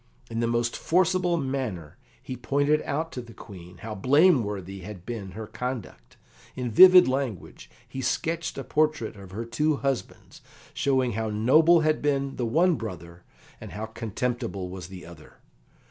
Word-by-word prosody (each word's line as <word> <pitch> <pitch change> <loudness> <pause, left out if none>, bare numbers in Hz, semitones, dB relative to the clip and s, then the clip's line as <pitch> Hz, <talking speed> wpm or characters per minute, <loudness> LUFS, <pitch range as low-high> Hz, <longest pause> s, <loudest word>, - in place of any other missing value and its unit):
In 115 - -3
the 115 - +1
most 115 0 0
forcible 180 0 +1
manner 130 - -4 0.3
he 130 - -6
pointed 145 +5 +1
out 160 +3 -2
to 125 - -5
the 115 -2 -14
Queen 90 -3 -12
how 110 -1 -5
blameworthy 105 - +2
had 95 -1 -10
been 100 -6 -6
her 110 0 -6
conduct. 120 - -6 0.4
In 125 -2 -3
vivid 185 +8 +9
language 130 - -4 0.2
he 130 +2 -6
sketched 160 +6 -2
a 135 - -4
portrait 155 -8 0
of 100 -2 -12
her 110 +5 -5
two 150 +6 0
husbands, 135 -3 -4 0.3
showing 130 -3 +1
how 110 +1 -2
noble 155 +11 +4
had 155 0 +1
been 140 -2 -1
the 120 - -1
one 165 +7 +3
brother, 85 -5 -8 0.4
and 105 -5 -9
how 105 +3 -4
contemptible 110 -3 -4
was 90 -1 -8
the 95 -1 -10
other. 85 -3 -14
120 Hz, 160 wpm, -26 LUFS, 105-145 Hz, 0.4 s, vivid